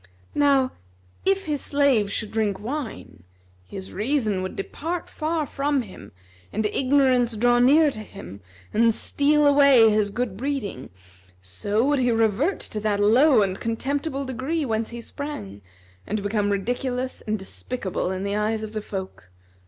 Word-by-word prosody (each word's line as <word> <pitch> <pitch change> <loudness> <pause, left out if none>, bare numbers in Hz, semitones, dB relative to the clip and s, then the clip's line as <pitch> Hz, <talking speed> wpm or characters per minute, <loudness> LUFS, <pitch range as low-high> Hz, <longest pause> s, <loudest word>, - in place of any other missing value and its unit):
Now, 275 -3 +3 0.5
if 390 0 +2
his 295 -3 -1
slave 275 -8 +2
should 215 +1 -3
drink 210 -3 0
wine, 230 - -6 0.5
his 190 -1 -8
reason 215 -3 0
would 185 - -5
depart 330 - -4
far 315 0 -2
from 280 -1 -1
him 200 - -12 0.4
and 215 +1 -1
ignorance 255 -1 +2
draw 240 +2 +3
near 290 +5 +5
to 215 - -5
him 200 - -10 0.3
and 230 +1 +4
steal 295 +1 +2
away 280 -6 +6
his 210 -1 +2
good 225 -3 -3
breeding, 245 - -4 0.5
so 200 - -1
would 290 0 +2
he 245 -1 +2
revert 225 - +1
to 215 - -4
that 210 -1 0
low 235 +3 +5
and 190 0 -2
contemptible 275 +5 -2
degree, 265 +5 -2
whence 220 -2 -1
he 235 0 -7
sprang, 225 - -7 0.5
and 210 0 -2
become 205 0 0
ridiculous 245 +5 -2
and 215 0 0
despicable 190 -1 -4
in 190 0 -3
the 200 0 -1
eyes 215 +1 0
of 215 0 -7
the 215 - -3
folk. 190 - -7
230 Hz, 150 wpm, -24 LUFS, 205-280 Hz, 0.5 s, away